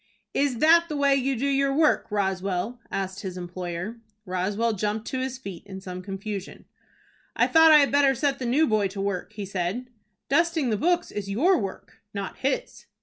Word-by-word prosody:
"Is 275 -3 +1
that 330 +5 +6
the 300 - -3
way 280 -1 +4
you 270 0 0
do 250 +4 -2
your 275 0 +2
work, 310 0 +3
Roswell?" 195 +2 -1
asked 190 0 -3
his 185 -2 -6
employer. 180 +4 -5 0.3
Roswell 200 +5 0
jumped 210 +2 -2
to 260 - -2
his 260 0 -3
feet 195 -9 -8
in 190 -1 -7
some 185 -1 -7
confusion. 195 +1 -6 0.7
"I - - +4
thought 320 0 +6
I 305 - +9
had 285 -2 +4
better 280 -1 +4
set 275 +2 0
the 250 - -3
new 285 +7 +3
boy 215 -6 +2
to 195 +1 -8
work," 195 0 -3
he 210 -2 -5
said. 195 +7 -3 0.4
"Dusting 320 -3 +2
the - - +2
books 350 - +1
is 200 -1 -5
your 310 - +3
work, 195 -2 -7
not 200 -1 -4
his." 270 0 -3
215 Hz, 190 wpm, -26 LUFS, 195-275 Hz, 0.7 s, I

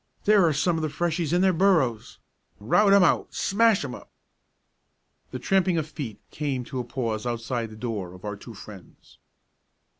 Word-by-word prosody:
There 210 -2 +5
are - - +3
some 165 +4 +1
of - - -2
the 155 - -1
Freshies 165 0 -1
in 175 +1 +2
their 190 -1 +4
burrows. 160 - +1 0.4
Rout 195 - +3
'em 200 -1 +6
out! - - +1
Smash 215 -4 +2
'em 125 - -6
up!" - - -11 1.2
The 130 - -5
tramping 185 +6 +1
of 155 -2 -1
feet 140 -9 -7
came 140 -4 -3
to 130 +1 -6
a - - -2
pause 120 -2 -3
outside 120 0 -3
the 110 - -11
door 105 -6 -5
of 90 - -13
our 105 0 -4
two 110 +3 -12
friends. 100 -2 -14
135 Hz, 180 wpm, -25 LUFS, 115-175 Hz, 1.2 s, em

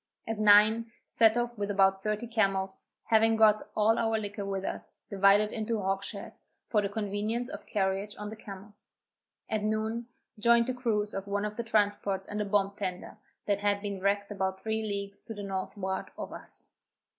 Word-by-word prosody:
At 225 -1 -3
nine, 215 +2 +6
set 225 0 +4
off 240 0 -1
with 205 0 -1
about 195 -1 +3
thirty 215 +3 -1
camels, 195 -4 0 0.2
having 225 0 +4
got 215 -1 +4
all 220 +1 +3
our 225 -1 +1
liquor 205 -1 -4
with 195 -1 -2
us, - - -5
divided 200 +2 +5
into 220 0 -2
hogsheads, 195 +1 -4 0.2
for 210 - +3
the 200 - -1
convenience 215 +3 -2
of - - -8
carriage 195 0 -1
on 210 0 -6
the - - -6
camels. 205 -1 -12 0.6
At 215 - -1
noon, 220 +2 -1 0.3
joined 235 +2 +5
the 255 - -1
crews 220 -4 -1
of 195 0 -4
one 200 +1 -1
of 210 0 -4
the 235 - -3
transports 205 -3 +1
and 210 0 -3
a - - -1
bomb 200 -1 +2
tender, 190 +1 -5 0.3
that 200 -1 +1
had 205 0 +1
been 200 -1 -4
wrecked 200 +1 0
about 190 -1 -2
three 220 0 -1
leagues 200 -2 -4
to 225 - -8
the 205 - -6
northward 190 0 -3
of - - -6
us. - - -8
205 Hz, 180 wpm, -30 LUFS, 200-220 Hz, 0.6 s, nine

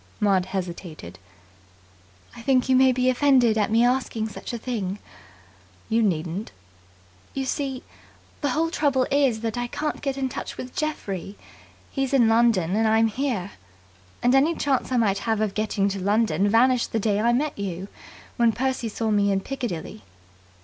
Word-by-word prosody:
Maud 195 -3 +2
hesitated. 170 - -6 1.2
"I - - -10
think 255 0 +2
you 260 - +4
may 260 0 +6
be 250 0 0
offended 255 -3 +4
at 215 -1 +1
my 225 +1 +4
asking 245 -3 0
such - - -7
a 240 - -3
thing." 215 -5 -3 0.9
"You 225 +1 +2
needn't." 180 0 -1 0.8
"You 270 -1 -2
see, 265 -1 -3 0.6
the 290 - 0
whole 325 +5 0
trouble 275 -6 +1
is 270 -6 +2
that 230 +1 -2
I 245 - -2
can't 300 +5 -3
get 275 -1 -2
in 270 -1 0
touch - - -6
with 255 0 -8
Geoffrey. 205 - -4 0.5
He's 270 -1 -1
in 240 -4 +5
London, 225 -6 +3
and 220 +1 +2
I'm 220 +1 +3
here. 220 -6 -2 0.7
And 245 +1 +4
any 290 +5 +4
chance 270 -3 0
I 255 - +2
might 200 -4 +2
have 225 -2 -1
of 215 -2 0
getting 210 -2 0
to 195 0 -4
London 200 -2 +1
vanished 245 +3 +3
that 225 - +1
day 205 -1 +1
I 235 +2 +3
met 285 +5 0
you, 190 -2 -5 0.5
when 235 -2 +3
Percy 260 -2 -1
saw 220 +1 -2
me 200 -1 +3
in 195 - +1
Piccadilly." 200 - -5
230 Hz, 170 wpm, -24 LUFS, 200-260 Hz, 1.2 s, may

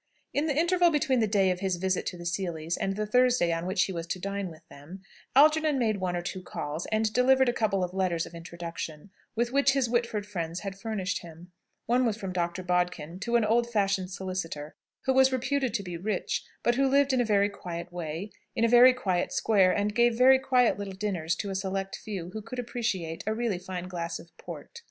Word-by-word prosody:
In 290 +3 +1
the 290 -2 0
interval 350 +1 +4
between 295 -5 +1
the 220 - +2
day 195 -2 +3
of 180 - -2
his 190 -1 0
visit 185 +1 -1
to 180 - -4
the 175 - -9
Seelys 170 -2 -2
and 195 0 -2
the 215 +1 -1
Thursday 250 -5 +3
on 165 +2 -3
which 185 0 +2
he - - -2
was 170 -1 -5
to 175 - -2
dine 200 0 -3
with 160 0 -15
them, 155 +7 -12 0.3
Algernon 305 +1 +5
made 220 -5 +1
one 185 -2 -2
or 175 - -3
two 185 +2 -5
calls, 155 -2 -5
and 215 0 0
delivered 260 +1 +4
a 240 - +2
couple 200 -5 +1
of 180 0 -3
letters 180 -3 0
of - - -12
introduction, 170 0 -7 0.2
with 235 +1 0
which 280 0 +4
his 270 -3 +1
Whitford 230 -3 -1
friends 170 -4 -4
had 195 -2 -5
furnished 195 -2 -3
him. 170 +1 -13 0.3
One 245 +2 +2
was 225 -4 0
from 190 -3 -5
Dr. 175 +1 -2
Bodkin 180 -2 -1
to 235 +4 -1
an 235 -2 +4
old 235 +2 +2
fashioned 195 -4 +1
solicitor, 185 -5 -5 0.3
who 265 - +3
was 265 0 +5
reputed 260 0 0
to 200 - -1
be 175 -2 -5
rich, 195 +2 -2 0.2
but 240 - +3
who 270 +2 +2
lived 275 0 +3
in 255 - +3
a - - +3
very 205 -2 +3
quiet 175 -3 -7
way, 170 +4 -5 0.2
in 230 - +2
a - - +4
very 245 +2 +7
quiet 185 -8 -1
square, 195 -4 +3
and 205 +1 0
gave 235 0 +3
very 260 +1 +7
quiet 250 -4 +2
little 195 -1 -5
dinners 185 -5 -1
to 200 +3 -4
a - - -2
select 195 0 -2
few 185 -5 -6
who 220 - -5
could 250 +4 -8
appreciate 220 -9 -3
a 215 - +1
really 225 -5 -1
fine 180 -1 -6
glass 170 -2 -4
of 170 0 -15
port. 475 - -9
195 Hz, 225 wpm, -28 LUFS, 175-240 Hz, 0.3 s, very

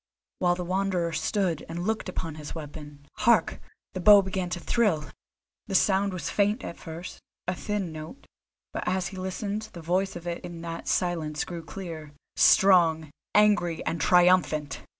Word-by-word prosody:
While 175 -1 +3
the 180 0 -5
Wanderer 185 -2 0
stood 165 +1 -1
and 170 +2 -4
looked 220 -2 -1
on 165 -3 -5
his 150 0 -8
weapon, 150 -2 -9
hark! 230 +2 +3 0.3
the 185 - -4
bow 200 +2 +8
began 190 -1 -3
to 175 - -3
thrill! 170 -8 0 0.6
The 195 - -3
sound 195 +1 +3
was 185 -2 -4
faint 210 +4 +1
at 170 - -7
first, 165 +2 -8 0.3
a 180 - +1
thin 200 -1 -3
note, 155 - -9 0.5
but - - -4
as 185 0 0
he 190 - -10
listened 200 +3 -4
the 170 - -8
voice 185 +4 0
of 175 0 -8
it 170 -1 -4
in 175 -1 -7
that 165 0 -6
silence 160 -4 -1
grew 170 -2 -7
clear, 160 -2 -8 0.2
strong, 165 -5 +5 0.2
angry 205 -6 +3
and 165 -1 -2
triumphant. 175 -5 +3
175 Hz, 165 wpm, -27 LUFS, 160-195 Hz, 0.6 s, bow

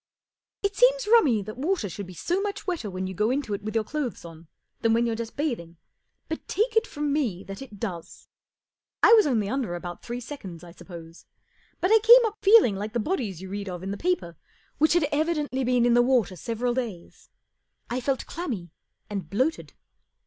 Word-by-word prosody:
It 400 0 0
seems - - +4
rummy 315 - +4
that 215 +4 -8
water 320 - 0
should 200 +1 -7
be 185 - -11
so 355 - -1
much 405 0 -4
wetter 345 - -2
when 185 0 -4
you 190 - -4
go 210 +4 +1
into 260 -4 -1
it 200 - -3
with 215 +2 -5
your 225 - +2
clothes 265 - -4
on 165 0 -12 0.3
than 225 -1 +2
when 235 +1 +3
you're 230 - 0
just 230 0 -6
bathing, 230 - -3 0.5
but 320 - -5
take 450 +3 0
it 445 +1 +3
from 295 -1 -2
me 225 -12 -1
that 195 +3 -8
it 215 -7 -10
does, 180 -7 -6 0.8
I - - +8
w 460 - +9
r - - +8
as 420 - +3
only 225 -7 +1
under 235 -6 -2
about 175 0 -7
three 240 +1 -5
seconds, 195 - -8
I 175 - -11
suppose, 170 -2 -12 0.5
but 365 - +1
I 445 - +7
came 470 +3 +8
up 435 -1 -3
feeling 405 - +6
like 210 +3 -5
the 240 - 0
bodies 215 - -2
you 190 - -8
read 200 0 -4
of 180 0 -6
in 195 - -3
the - - -2
paper 265 - -2 0.4
which 310 +3 +4
,f 345 - +4
had 290 - 0
evidently 295 -3 0
been 245 -1 +2
in 240 - +4
the 240 - +6
water 240 -7 +2
several 230 +7 -2
days. 225 -9 -6 0.3
" - - -46
I 250 +1 -1
felt 265 +1 -1
clammy 235 - -5 0.4
and 200 -2 -5
bloated. 260 - -1
240 Hz, 215 wpm, -26 LUFS, 195-310 Hz, 0.8 s, w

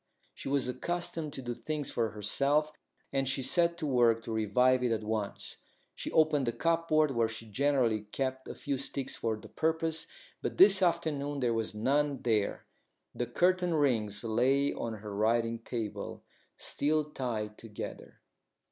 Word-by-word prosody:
She - - -6
was 140 -2 +1
accustomed 165 +3 -2
to 135 - -6
do 120 0 -3
things 150 +3 -4
for 115 -2 0
herself, 140 +9 +1 0.4
and 135 -1 +1
she 135 0 -1
set 170 +5 +3
to 165 - -3
work 120 -4 +3
to 115 - -6
revive 125 +4 +3
it 125 - +1
at 110 -1 0
once. 105 -2 -3 0.4
She - - -5
opened 155 -4 +3
the - - +2
cupboard 155 +2 +2
where 115 -3 +2
she 115 0 -7
generally 120 -1 +1
kept 130 -1 -2
a - - -6
few 140 -2 -3
sticks 135 0 -3
for 110 -1 -1
the - - -12
purpose, 160 0 0 0.3
but - - -3
this 195 0 +7
afternoon 155 -5 0
there 120 -3 +1
was 115 -1 -2
none 140 +4 +1
there. 110 -4 0 0.5
The 120 - -2
curtain 180 +5 +2
rings 110 -9 +1
lay 130 +5 +2
on 115 - -4
her 105 -1 -6
writing 115 +2 +1
table, 115 -2 -5 0.3
still 155 +1 0
tied 110 -6 -3
together. 110 -3 -8
130 Hz, 160 wpm, -31 LUFS, 115-150 Hz, 0.5 s, this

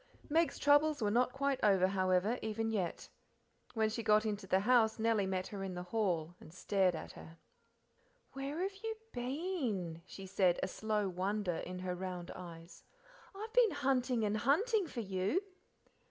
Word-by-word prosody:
Meg's 330 +2 +2
troubles 290 +1 +4
were 210 -3 +1
not 245 +3 +3
quite 275 0 0
over, 195 -3 +5
however, 190 +4 +1
even 225 +1 -2
yet. 190 -6 -2 0.7
When 220 -1 +3
she 220 +2 -3
got 215 0 +4
into 205 -2 -3
the 190 +1 +3
house 225 0 +4
Nellie 220 -3 +2
met 185 -1 -1
her 200 -2 -5
in 190 -2 -4
the 180 - -4
hall 180 -5 -1
and - - -13
stared 185 0 +1
at - - -7
her. 165 +1 -12 1.0
"Where 275 +5 -4
have 390 +1 -2
you 445 0 -2 0.2
been?" 245 - -2
she 195 - -9
said, 185 -2 +2
a - - +1
slow 210 +1 -1
wonder 190 0 -1
in 180 0 -5
her 180 0 -3
round 180 -1 -5
eyes. 170 -1 -10 0.5
"I've 435 +3 -7
been - - +6
hunting 260 - +1
and 210 +1 0
hunting 375 - +2
for 245 -5 -4
you." 195 - 0
215 Hz, 170 wpm, -35 LUFS, 185-265 Hz, 1.0 s, been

